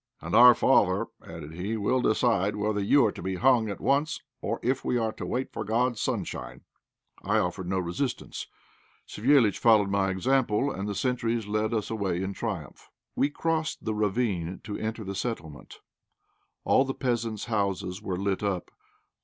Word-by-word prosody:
"And 85 - -7
our 120 +1 +9
father," 105 -4 +3
added 80 -1 -9
he, 100 +7 -3
"will 125 +5 +1
decide 110 -4 +2
whether 105 0 -1
you 120 +6 +4
are 105 - +2
to - - -9
be 95 0 -2
hung 120 +1 +3
at 100 - -5
once 145 +3 +1 0.2
or - - -2
if 130 +2 0
we 125 - 0
are 115 -2 0
to - - -7
wait 130 +1 -3
for - - -3
God's 115 +2 0
sunshine!" - - -3 0.6
I - - +1
offered 90 +1 -1
no 95 +1 0
resistance. 95 +9 -3 0.6
Savéliitch 115 -2 +3
followed 105 -4 +4
my 100 -1 +2
example, 125 +5 +1
and 100 -1 -4
the 100 - -3
sentries 120 -2 -1
led 110 +2 -1
us 110 -2 -2
away 95 -5 -1
in 95 +1 -3
triumph. 95 - -6 0.3
We 140 - +2
crossed 160 +1 -2
the 110 - 0
ravine 100 -4 -1
to 105 - -5
enter 110 0 -4
the 95 0 -5
settlement. 95 -8 -6 0.8
All 130 - +4
the 135 -1 -4
peasants' 115 -4 -2
houses 100 -4 -2
were 95 -4 -3
lit 100 0 -1
up. 100 -4 -2
110 Hz, 170 wpm, -27 LUFS, 95-120 Hz, 0.8 s, our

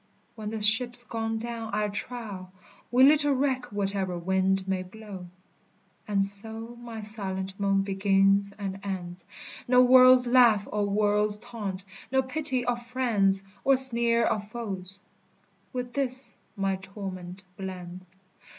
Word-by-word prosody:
When 215 -2 -7
the 220 -1 -4
ship's 240 +3 +6
gone 225 -1 -4
down, 230 0 -6
I 210 0 -1
trow, 200 -2 -7 0.4
We 250 +1 +3
little 290 0 +4
reck 260 -2 -2
whatever 195 -3 -3
wind 190 +2 -1
may 190 -1 -2
blow. 190 -1 -11 0.8
And 200 -2 +2
so 220 +4 0
my 230 -2 -8
silent 195 -3 -3
moan 195 -1 0
begins 195 0 +1
and 195 -2 -6
ends, 180 -3 -7 0.4
No 250 0 +5
world's 255 0 +6
laugh 240 -4 +3
or 205 -1 -1
world's 210 0 0
taunt, 210 -5 -7 0.3
no 265 0 +1
pity 260 -2 -2
of 240 -1 -2
friends 220 -6 0 0.2
Or 275 - +3
sneer 235 -3 +7
of 210 -1 -2
foes, 195 -4 -6 0.7
with 250 -2 -6
this 260 -1 0 0.2
my 195 -1 -2
torment 190 -1 -9
blends. 185 -1 -9
210 Hz, 130 wpm, -26 LUFS, 195-240 Hz, 0.8 s, sneer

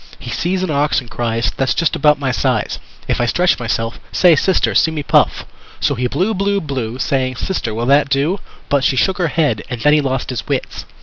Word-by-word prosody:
He - - -8
sees 185 +2 -1
an 185 - -1
ox 145 +1 +1
and 125 -4 -12
cries: 115 -3 -1
"That's 135 -1 +1
just 165 - +1
about 150 -1 +3
my 135 -2 -1
size, - - -1 0.3
If - - 0
I 120 - +1
stretch 180 +6 +2
myself 115 -1 -2
Say 175 -3 +5
Sister, 185 +5 +1
see - - +4
me 155 -2 -4
puff!" - - +2 0.3
So - - +1
he 125 +1 -1
blew, 190 - 0
blew, 200 0 0
blew, 130 - -4
Saying: 130 -1 -1
"Sister, 125 -5 -3
will 115 +1 -2
that 140 +2 +3
do?" 145 +8 +1 0.3
But 140 -2 +1
she 135 - +2
shook 190 +8 +1
her 175 - +2
head. 150 -8 0
And 120 -2 -5
then 150 +3 +4
he 150 - +4
lost 135 -2 -2
his 120 -2 -5
wits. - - -3
140 Hz, 225 wpm, -17 LUFS, 125-165 Hz, 0.3 s, Say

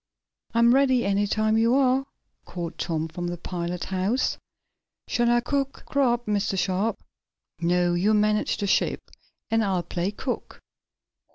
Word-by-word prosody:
"I'm 235 +1 +5
ready, 260 -2 +3
any 200 +1 +1
time 215 +1 +1
you 230 +2 +3
are," 270 0 +2 0.4
called 175 -2 -6
Tom, 160 -1 -1
from 175 +2 -5
the 175 0 -4
pilot 175 0 -4
house. 190 +7 0 0.7
"Shall 240 -1 +1
I 240 0 +3
cook 275 +1 -2
grub, 245 -4 +1
Mr. 205 -2 0
Sharp?" 195 +4 0 0.6
"No, 175 +1 +2
you 200 +5 +2
manage 210 0 +1
the 205 - -2
ship, 195 - 0 0.4
and 225 0 +3
I'll 190 -4 0
play 175 +2 -2
cook. 245 +5 -5
210 Hz, 145 wpm, -25 LUFS, 180-240 Hz, 0.7 s, I'm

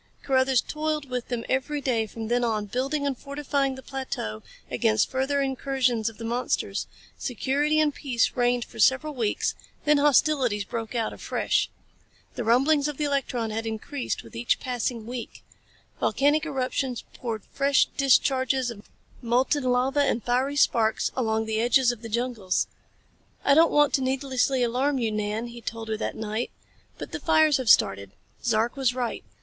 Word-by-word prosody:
Carruthers 260 -1 +3
toiled 305 -3 -3
with 250 -1 -3
them 240 -2 -3
every 270 +3 -1
day 235 -5 0
from 225 +1 -6
then 245 +1 +1
on, 215 -3 0
building 270 +7 -1
and 280 -2 0
fortifying 280 0 -2
the 265 - -11
plateau 255 - -5 0.3
against 110 0 +2
further 270 +2 +1
incursions 260 -4 0
of 225 - -15
the 230 - -8
monsters. 240 +2 -1 0.3
Security 285 +5 0
and 300 -2 +3
peace 250 -5 0
reigned 245 -1 +1
for - - -13
several 265 +3 +3
weeks 230 -6 0 0.3
then 300 -1 +4
hostilities 275 -6 +3
broke 230 +2 -5
out 230 -2 -1
afresh. - - 0 0.6
The 245 - -4
rumblings 275 +6 +3
of 295 -2 -4
the 300 - -1
electron 260 -5 -1
had 225 +1 -3
increased 235 +5 -4
with 115 - -14
each 115 +1 +1
passing 245 -2 -3
week. 240 0 -7 0.6
Volcanic 300 +3 +2
eruptions 260 -3 -2
poured 225 -5 -5
fresh 275 0 +3
discharges 260 -2 +2
of 210 -2 -12 0.3
molten 255 +4 +1
lava 255 +3 +2
and 245 -5 +1
fiery 255 +4 0
sparks 225 -6 +2
along 220 -3 0
the 220 0 -1
edges 245 +1 +4
of 240 -2 -9
the 230 - -7
jungles. 230 -5 0 0.8
"I 280 - +6
don't 325 +3 +6
want 295 -1 +4
to 270 - +2
needlessly 260 0 0
alarm 260 +4 +1
you, 230 -3 0
Nan," 210 +2 -2
he 235 0 -10
told 225 -1 -6
her 220 - -1
that - - -3
night, 220 +2 -3 0.5
"but - - -7
the - - -4
fires 315 -2 +4
have 255 -4 -2
started. 100 - +4 0.3
Zark 230 0 +1
was 260 -3 +1
right. 245 -2 -3
255 Hz, 165 wpm, -26 LUFS, 230-275 Hz, 0.8 s, I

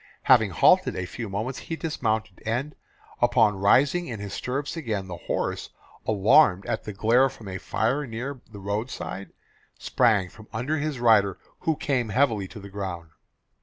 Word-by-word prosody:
Having - - +5
halted - - +4
a 95 - -3
few 115 +3 -6
moments 110 +7 -3
he 165 - -5
dismounted, 110 - -2
and 125 +7 -2 0.5
upon 115 -5 +3
rising 140 - +3
in 115 -4 -5
his 100 -1 -6
stirrup 135 +3 -3
again, 110 - -3
the 90 - -6
horse, - - -3 0.4
alarmed 100 -1 +4
at - - -3
the 105 - -4
glare 115 +6 +3
from 120 -6 -12
a 95 0 -5
fire 135 +6 -1
near 125 +3 -5
the 105 - -10
road 100 +5 -3
side, 100 -5 -6 0.5
sprang 100 -5 +2
from 110 +4 -15
under 125 +8 -2
his 150 -3 -3
rider 105 -5 +4 0.2
who 160 - 0
came 130 -6 -1
heavily 110 -4 +1
to 105 - -10
the 100 - -10
ground. 95 -5 -6
110 Hz, 165 wpm, -25 LUFS, 100-130 Hz, 0.5 s, Having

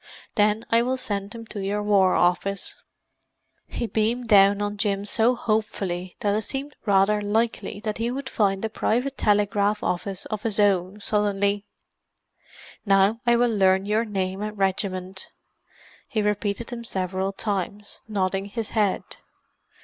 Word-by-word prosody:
Then 210 +1 +2
I 230 0 +5
will 255 +2 0
send 200 -5 -3
them 230 +1 -9
to 205 - -4
your 200 +2 -1
War 195 -3 +4
Office." 190 +3 +1 0.9
He - - -3
beamed 225 +2 -1
down 200 -1 +6
on 205 0 -2
Jim 200 -1 0
so 230 +4 +2
hopefully 195 -6 -2
that 205 -1 +1
it 215 - +1
seemed 275 +6 -5
rather 200 +1 +4
likely 215 0 -1
that 215 0 -3
he 230 +1 0
would 265 +2 -4
find 200 -4 +1
a - - +1
private 250 +5 0
telegraph 205 -1 +1
office 190 +1 -2
of 215 -2 -4
his 215 -2 -1
own, 200 0 +2
suddenly. 205 -1 0 1.2
"Now 200 +2 +3
I 240 - +6
will 235 -1 +2
learn 190 -1 +3
your 215 +2 +1
name 190 -3 -3
and 210 0 -4
regiment." 190 -1 -2 0.8
He 215 -5 -1
repeated 210 +2 -1
them 235 -1 -6
several 190 -2 -2
times, 200 0 -4
nodding 195 -2 -1
his 215 +2 -5
head. 210 -4 +1
205 Hz, 150 wpm, -24 LUFS, 195-220 Hz, 1.2 s, down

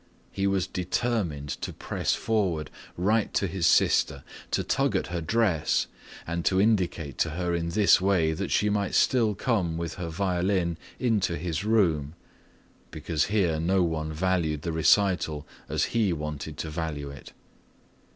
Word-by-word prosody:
He 100 0 -1
was 95 -2 +1
determined 90 -5 -2
to - - -3
press - - -2
forward 95 -9 -1 0.3
right 105 +5 +1
to - - +2
his 95 -2 0
sister, 70 -1 +3 0.3
to - - 0
tug - - +1
at - - +1
her 85 - -1
dress, 95 -3 +1 0.4
and 85 0 -3
to 95 - +3
indicate 90 - +1
to 80 - +2
her 90 +2 -2
in 85 0 -1
this 100 0 +4
way 90 -5 +2
that - - -3
she 105 - +2
might 100 -2 0
still 115 -5 +3
come 95 -10 0
with 85 -1 -3
her 85 - -3
violin 90 -1 0 0.2
into 105 -8 +1
his 85 -1 -3
room, 85 -9 +1 0.7
because 80 0 -1
here 95 -7 +1
no 90 +3 +2
one 80 -2 -2
valued 80 -3 0
the 85 - -2
recital 80 -3 +2 0.2
as - - 0
he 110 -5 +2
wanted 75 -1 -5
to 80 - -4
value 75 -3 -4
it. 70 - -12
85 Hz, 155 wpm, -27 LUFS, 80-100 Hz, 0.7 s, this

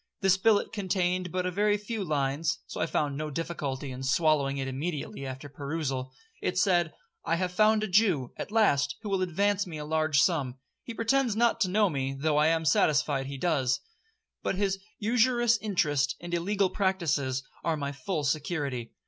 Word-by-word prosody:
This 190 -2 +5
billet 205 +2 +2
contained 185 -3 -1
but 180 +1 -1
a 185 - -1
very 205 +3 +2
few 210 0 -4
lines, 150 0 0
(so - - -6
I 160 - +1
found 150 -2 -1
no 155 +2 -3
difficulty 145 -4 -4
in 130 +1 -7
swallowing 140 0 +2
it 135 -1 -2
immediately 140 0 -4
after 130 +2 -7
perusal). 140 -2 -4 0.3
It 180 - -1
said, 175 -4 +3 0.3
'I 165 - +1
have 180 +1 -1
found 215 +3 +3
a - - -1
Jew, 180 - +2
at - - -6
last, 145 -11 +3
who 210 - -4
will 195 -1 0
advance 200 +3 +1
me 160 -3 -6
a 150 - -5
large 155 -1 +1
sum. 135 -6 +1 0.2
He 235 - -8
pretends 240 0 +1
not 230 0 +2
to 185 - +3
know 205 +2 +3
me, 135 -5 -2
though 150 0 +1
I 150 +1 +4
am 160 0 +1
satisfied 145 -2 +2
he 140 0 -6
does.—But 195 - -3
his 195 0 0 0.2
usurious 235 +1 +3
interest 150 -9 +1
and 175 0 -7
illegal 195 +3 +1
practices 150 -10 0 0.2
are 165 -2 0
my 140 -1 -3
full 150 +4 -3
security. 140 -4 -2
165 Hz, 180 wpm, -28 LUFS, 140-200 Hz, 0.3 s, This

